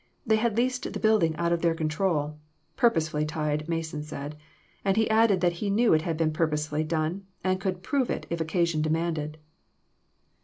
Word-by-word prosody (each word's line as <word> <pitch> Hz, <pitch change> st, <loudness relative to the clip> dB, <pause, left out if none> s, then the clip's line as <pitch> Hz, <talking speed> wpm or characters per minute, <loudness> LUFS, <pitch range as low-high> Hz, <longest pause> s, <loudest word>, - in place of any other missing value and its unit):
They 220 Hz, -2 st, +4 dB
had 220 Hz, -1 st, 0 dB
leased 250 Hz, +1 st, 0 dB
the -, -, -4 dB
building 215 Hz, -8 st, +3 dB
out 170 Hz, +1 st, 0 dB
of 170 Hz, -, 0 dB
their 170 Hz, -1 st, +2 dB
control. 155 Hz, -2 st, -1 dB, 0.4 s
Pur 240 Hz, -, +5 dB
posely 155 Hz, -6 st, -1 dB
tied, 150 Hz, 0 st, -2 dB
Mason 160 Hz, -2 st, -2 dB
said; 150 Hz, 0 st, -6 dB, 0.5 s
and 195 Hz, +1 st, +1 dB
he 220 Hz, -, +3 dB
added 220 Hz, -4 st, +4 dB
that 175 Hz, -1 st, +3 dB
he 205 Hz, -, 0 dB
knew 220 Hz, +2 st, +4 dB
it 155 Hz, -, +4 dB
had 165 Hz, -1 st, -2 dB
been 155 Hz, -1 st, +1 dB
purposely 150 Hz, -2 st, 0 dB
done, 160 Hz, +4 st, -2 dB, 0.2 s
and 185 Hz, 0 st, 0 dB
could 185 Hz, -2 st, -2 dB
prove 265 Hz, +5 st, 0 dB
it, -, -, -2 dB
if 170 Hz, -1 st, -1 dB
occasion 165 Hz, -1 st, +1 dB
demanded." 155 Hz, -1 st, -1 dB
165 Hz, 185 wpm, -27 LUFS, 155-195 Hz, 0.5 s, Pur